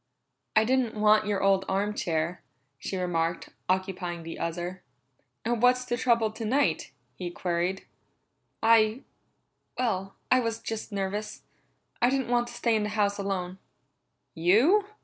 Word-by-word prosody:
"I 215 - +6
didn't 250 -2 +1
want 215 0 +4
your 200 -2 0
old 195 -1 +4
arm 200 +2 0
chair," 170 -2 -2 0.4
she 190 - -4
remarked, 170 -2 -1 0.2
occupying 185 -2 -1
the 165 - -7
other. 175 +2 -4 0.6
"And 235 -1 0
what's 250 0 +4
the 240 - -1
trouble 235 -3 +2
tonight?" 230 +6 0 0.2
he 180 -2 -5
queried. 175 +2 -2 0.8
"I 225 +1 +4 0.7
well, 195 -6 -1 0.2
I 255 - +6
was 230 -2 -1
just 225 0 -5
nervous. 205 +2 -3 0.6
I 245 - +5
didn't 265 -2 0
want 240 0 +2
to - - -9
stay 235 -2 +1
in 215 - +1
the 210 - -1
house 205 -1 +1
alone." 190 -2 -3 0.7
"You?" 230 - +4
210 Hz, 140 wpm, -28 LUFS, 185-235 Hz, 0.8 s, I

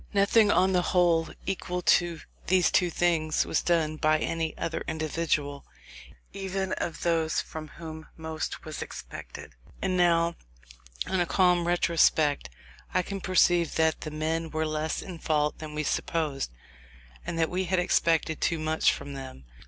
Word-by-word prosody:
Nothing, 205 +2 +5
on 190 -1 +3
the 180 - +3
whole 175 -2 +2 0.2
equal 180 -2 -3
to 170 -1 +3 0.3
these 185 -1 +4
two 180 - +3
things, 165 -2 +1
was - - 0
done 160 -3 +1
by 155 0 +3
any 160 +1 -2
other 165 0 -3
individual, 155 -2 -1 0.7
even 190 -1 -3
of 165 - -4
those 160 -3 +1
from 155 -1 -6
whom 160 0 -9
most 160 -1 -5
was 155 -2 -6
expected. - - -8 0.3
And 190 -1 -1
now, 170 -1 +3 0.7
on 190 0 -1
a 175 - +1
calm 180 -2 +3
retrospect, 160 - +2 0.4
I 185 - +1
can 195 +1 -5
perceive 175 -3 +3
that 160 0 +2
the 155 - -4
men 160 +2 -2
were 155 0 -1
less 155 0 -2
in 180 -4 -8
fault 150 -2 0
than 155 -1 -7
we 155 - -1
supposed, 150 -2 -1 0.7
and 165 - -4
that 165 -1 +1
we 185 +1 -1
had 185 +1 0
expected 165 -3 +1
too 165 - +1
much 155 0 +2
from 140 - -6
them. 130 - -9
165 Hz, 155 wpm, -28 LUFS, 155-180 Hz, 0.7 s, Nothing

